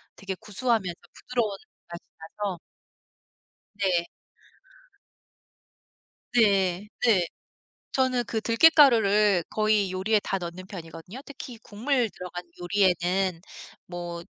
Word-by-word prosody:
되게 195 -1 -5
구수하면서 220 -3 -1 0.2
부드러운 230 -5 -2 0.3
맛이 170 0 -7 0.2
나서 185 +2 -5 1.2
네. 180 -4 +2 2.3
네 200 -4 +3 0.2
네. 200 -7 +4 0.7
저는 255 -2 +1
그 220 +1 -2
들깻가루를 225 - +5
거의 215 -3 +2
요리에 205 +3 +1
다 195 - -1
넣는 180 +1 -7
편이거든요. 175 +4 -9
특히 260 -4 -9
국물 240 +3 0
들어간 180 -1 -8 0.2
요리에는 180 -1 +1 0.5
뭐 175 -1 -6
200 Hz, 215 characters per minute, -26 LUFS, 180-225 Hz, 2.3 s, 들깻가루를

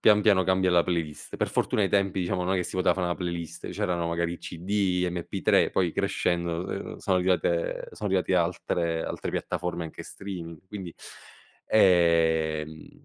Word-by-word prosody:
pian 105 -1 +5
piano 100 -3 +5
cambia 95 0 +2
la 85 -1 +5
playlist. 85 -4 -3
Per - - 0
fortuna 105 - +1
ai 95 - +1
tempi 100 -1 +1
diciamo 90 0 -1
non 95 +2 +1
è - - +2
che 90 - +1
si 95 - -5
poteva 90 - +3
fà 95 - -2
la 85 -1 0
playlist, 85 -2 -5
c'erano 85 -2 -1
magari 85 0 -1
CD, 90 +1 -1
MP3, 85 -1 +1
poi 90 -3 +1
crescendo, 85 -1 0 0.3
n - - -11
sono 90 -1 +1
arrivate 90 -2 0
son 105 - -5
arrivati 95 -1 +1
altre 85 -1 0
altre - - -4
piattaforme 85 -1 -3
anche 80 - -8
streaming, 85 -5 -8
quindi, 95 -4 -7 0.7
ehm, 80 -5 +2
90 Hz, 165 wpm, -27 LUFS, 85-95 Hz, 0.7 s, pian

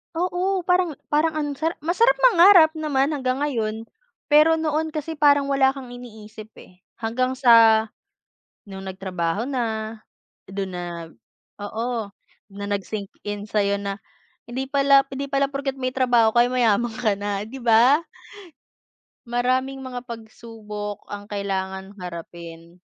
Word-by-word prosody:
Oo 365 +2 0
parang 360 -2 +1 0.2
parang 310 +2 +2
ang 305 -1 -2
sara 325 +2 -1
masarap 375 +11 +3
mangarap 365 -7 +7
naman 285 -3 +1
hanggang 260 0 -2
ngayon, 225 -6 -2 0.4
pero 305 +2 +6
noon 315 0 -1
kasi 315 0 -5
parang 285 -1 +4
wala 270 -1 +3
kang 270 -3 -9
iniisip 220 -3 -11
eh 180 0 -20 0.2
hanggang 255 +3 -1
sa, 230 -4 +5 0.8
nung 195 0 -8
nagtrabaho 190 +3 -3
na, 225 -4 -3 0.5
dun 195 0 -5
na, 170 -2 -6 0.5
oo, 225 +2 -3 0.5
dun - - -12
na 200 - -4
nag 200 -1 -2
sync 205 -3 -5 0.2
in 205 0 -5
sa'yo 200 -2 0
na 200 0 -4 0.5
hindi 260 +3 -5
pala 275 -1 +5
'di 275 +1 -4
pala 275 0 0
porket 275 -1 -3
may 255 - -1
trabaho 245 -3 +3
ka 240 - +6
ay 245 - -3
mayaman 235 -1 +2
ka 220 -4 0
na 200 -1 -3
'di 265 - -9
ba? 240 +7 +5 1.2
Maraming 255 +3 -1
mga 255 -2 -7
pagsubok 220 -3 -8
ang 205 0 -9
kailangang 190 -1 -4
harapin. 170 -2 -9
240 Hz, 140 wpm, -23 LUFS, 205-280 Hz, 1.2 s, mangarap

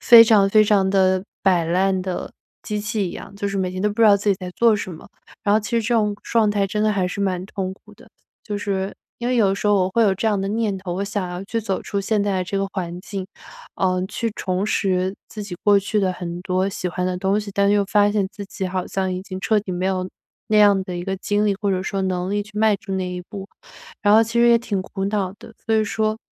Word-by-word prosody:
非 235 -2 +9
常 210 -3 +5
非 215 +1 +5
常 200 -2 +3
地 190 -1 +2 0.2
摆 180 -4 +3
烂 185 +3 +1
的 185 -1 -4 0.3
机 210 0 -3
器 210 -2 -2
一 - - -9
样。 - - -9
就 200 0 -2
是 195 - -3
每 185 -1 -1
天 185 0 -4
都 210 - +3
不 210 +3 -4
知 220 - +8
道 200 - +7
自 205 +1 -3
己 195 - +2
在 180 -1 -5
做 230 -2 +4
什 190 -3 -5
么， 160 - -12 0.3
然 205 - +2
后 - - +5
其 205 - -7
实 235 -1 +1
这 230 +3 -1
种 210 -2 +2
状 225 -2 +2
态 200 -1 +1
真 210 +2 -2
的 215 0 +3
还 185 -2 0
是 200 - -5
蛮 185 -2 -1
痛 190 -2 -4
苦 - - -19
的。 - - -18 0.4
就 205 -2 -3
是 195 -1 -2 0.2
因 240 +1 -2
为 255 - +1
有 215 -4 +4
的 195 - +1
时 205 - -3
候 205 - +5
我 185 -1 +2
会 230 +4 +2
有 200 -3 +4
这 205 +4 -2
样 205 - +1
的 195 - -2
念 215 -2 -1
头， 185 -2 -5
我 195 +2 -2
想 200 -2 -3
要 180 +2 -6
去 230 +3 -2
走 200 -3 -2
出 200 - -2
现 205 +1 0
在 190 -2 0
这 195 +2 -2
个 195 - 0
环 175 -2 -4
境， 195 0 -5 0.5
呃， 185 -1 +1
去 230 +3 -2
重 185 +2 -2
拾 190 -2 0
自 210 -1 -7
己 180 -3 -7
过 205 -1 +6
去 210 +2 -1
的 185 -2 +1
很 175 -1 -6
多 185 +1 0
喜 185 -2 -3
欢 180 +1 -2
的 185 - -1
东 195 +3 +1
西， 205 -1 -7
但 200 0 +3
又 205 -1 +3
发 205 +1 +3
现 200 -3 +1
自 205 -1 -7
己 190 -1 -4
好 185 0 -2
像 190 -1 -2
已 185 - -5
经 190 -1 -7
彻 215 +1 +2
底 195 -2 -6
没 180 +1 -1
有 185 -1 -1 0.4
那 215 - +4
样 200 -2 +5
的 180 - -6
一 175 - -4
个 195 0 -2
精 205 +2 0
力， 205 - +2
或 200 -2 0
者 185 -1 0
说 195 0 -2
能 185 -1 -1
力 205 0 0
去 210 - -15
迈 215 -2 +4
出 195 0 -8
那 185 -1 -2
一 180 0 -5
步， 195 +1 -9 0.5
然 205 0 +5
后 220 - +7
其 225 +1 -2
实 240 - +6
也 235 - +6
挺 210 -5 -2
苦 195 0 -5
恼 200 -2 -1
的， 225 - -13
所 225 - +2
以 220 - +3
说 215 +1 -1
195 Hz, 295 characters per minute, -22 LUFS, 185-210 Hz, 0.5 s, 非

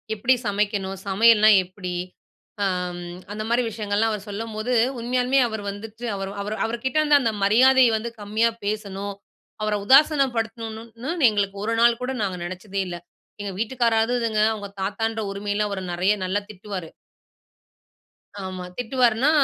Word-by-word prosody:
எப்டி 245 +5 +3
சமைக்கணும்? 200 -1 -1
சமையல்னா 215 +2 +6
எப்டி? 180 0 -6 0.7
அ, - - +3 0.3
ம். 175 0 -7 0.2
அந்த 215 +1 -4
மாரி 240 +1 +2
விஷயங்கள்லாம் 210 +1 0
அவர் 210 0 -6
சொல்லம்போது 220 +3 -3 0.3
உண்மயாமே 250 +2 +2
அவரு 220 -2 -5
வந்துட்டு, 225 +3 -9
அவரு 195 0 -4
அவரு 210 +2 -3
அவருகிட்டே 240 +6 -1
இருந்த 295 -1 +5
அந்த 225 -3 0
மரியாதைய 250 +3 +5
வந்து 235 +2 -5
கம்மியா 215 +3 +1
பேசணும். 200 -1 -3 0.5
அவர 215 0 +1
உதாசினப்படுத்தணும்னு 240 0 +2
எங்களுக்கு 200 -2 -1
ஒரு 230 - 0
நாள் 235 0 +5
கூட 250 +1 -2
நாங்க 190 -3 -1
நெனச்சதே 185 +3 -4
இல்ல. 175 -1 -5 0.4
எங்க 200 - -4
வீட்டுக்காராவது 230 0 +1
இதுங்க, 220 -2 +1
அவங்க 205 -2 -6
தாத்தான்ற 220 +3 -1
உரிமைல 205 +1 -1
அவர 200 -1 -3
நெறைய, 185 +4 +2
நல்லா 190 +2 0
திட்டுவாரு. 190 -4 -7 1.6
ஆமா 185 -1 -5
திட்டுவார்னா. 245 +2 +2
215 Hz, 135 wpm, -24 LUFS, 200-235 Hz, 1.6 s, சமையல்னா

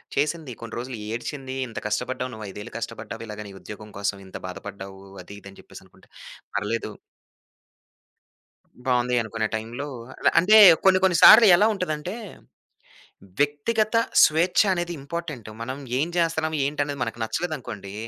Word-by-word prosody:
చేసింది. 150 0 -1
కొన్ని 115 -1 -8
రోజులు 125 0 -6 0.2
ఏడ్చింది. 130 +2 -5
"ఇంత 115 - -6
కష్టపడ్డావు 125 +4 -3
నువ్వు 110 -1 -8
5ఏళ్లు 105 +2 -9
కష్టపడ్డావు 115 0 -7
ఇలాగ 105 0 -7
నీ - - -10
ఉద్యోగం 105 0 -10
కోసం, 100 0 -2
ఇంత 95 - -8
బాధపడ్డావు. 95 +1 -9 0.2
అది - - -12
ఇది 100 - -11
అని 95 - -17
చెప్పేసనుకుంటా" - - -17 0.5
పర్లేదు. 105 +2 -2 2.0
బావుంది 125 -1 +1
అనుకునే 110 0 -3
టైంలో 115 +6 -4 0.5
అంటే 210 +5 +5 0.3
కొన్ని 190 -1 +6
కొన్ని 185 -2 +4
సార్లెలా 210 -3 +9
ఉంటదంటే, 175 -1 -4 1.3
వ్యక్తిగత 215 +11 +1 0.3
స్వేచ్ఛ 165 +6 +4
అనేది 175 -1 -2
ఇంపార్టెంట్ 140 -6 -6
మనం 130 +3 -4 0.2
ఏం 155 - 0
చేస్తున్నాం, 160 -2 0
ఏంటి 145 +1 -1
అనేది 140 -1 -6
మనకు 120 0 -7
నచ్చలేదనుకోండి, 120 - -5
130 Hz, 130 wpm, -24 LUFS, 110-165 Hz, 2.0 s, సార్లెలా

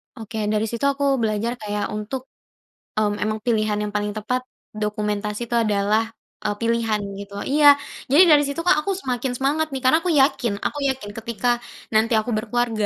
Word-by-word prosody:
Oke, 220 0 -7 0.2
dari 215 0 +1
situ 235 +4 -2
aku 280 0 0 0.2
belajar 225 +3 -1
kayak 210 -1 -3
untuk 215 +5 -4 0.8
mhm, 210 -1 +1
emang 215 0 -1
pilihan 215 -3 +1
yang 210 - -3
paling 210 0 -1
tepat, 250 +4 -1 0.3
dokumentasi 210 +1 -3
itu 240 - 0
adalah 215 0 +1 0.3
e - - -3
pilihan 230 -2 +1 0.2
gitu. 200 0 -9
Iya, 290 +1 +6 0.4
jadi 310 +6 +8
dari 290 -1 +7
situ, 280 +4 -3
Kak 355 -3 +4
aku 350 +6 -2
semakin 260 -7 -2
semangat 295 +4 +1
nih, 265 - -3
karena 260 +5 +5
aku 350 - -5
yakin 270 -6 +3
aku 290 - -1
yakin 260 -6 -3
ketika 235 +1 0 0.3
nanti 220 +1 +3
aku 220 +2 +1
berkeluarga, 225 -1 0
230 Hz, 175 wpm, -22 LUFS, 210-265 Hz, 0.8 s, jadi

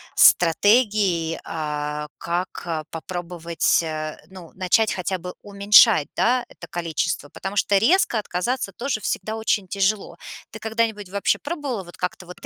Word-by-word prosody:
стратегий, 190 -2 +4
а-а, 150 -1 -4
как, 175 +2 -3
а, 160 -2 -3
попробовать, 170 0 -1
э, 155 -1 -5
ну, 185 -3 -12
начать 195 +4 +2
хотя 185 +1 -2
бы 180 +1 -7
уменьшать, 200 -3 +5
да, 245 +1 +2
это - - -12
количество. 165 -4 -2
Потому 195 +6 -6
что 200 0 +3
резко 240 - +3
отказаться 200 +3 -2
тоже 235 +2 -3
всегда 215 +2 -3
очень 220 -3 0
тяжело. 200 +2 -1 0.4
Ты 220 - -9
когда-нибудь 220 -2 -2
вообще 200 +1 0
пробовала 290 - -4
вот 175 -1 -14
как-то 180 0 -4
вот 180 - -11
190 Hz, 140 wpm, -23 LUFS, 170-215 Hz, 0.4 s, уменьшать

